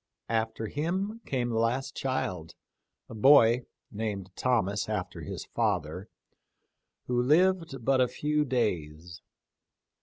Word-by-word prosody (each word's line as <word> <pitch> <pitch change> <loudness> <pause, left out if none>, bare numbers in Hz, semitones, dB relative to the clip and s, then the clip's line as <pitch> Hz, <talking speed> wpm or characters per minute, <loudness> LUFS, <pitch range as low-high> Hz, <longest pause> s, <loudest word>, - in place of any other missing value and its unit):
After 110 0 -1
him 185 - -2
came 125 -3 -1
the 115 -1 0
last 130 +4 -1
child, 95 -11 -3 0.5
a - - -10
boy 120 0 +6
— - - -52
named 105 -4 -4
Thomas 105 -5 0
after 95 -4 -3
his - - -6
father 95 -5 -2 0.5
— - - -53
who 125 -1 +1
lived 165 -2 +2
but 135 -1 +3
a 125 - +4
few 150 +3 0
days. 85 - -2
120 Hz, 125 wpm, -29 LUFS, 100-135 Hz, 0.5 s, boy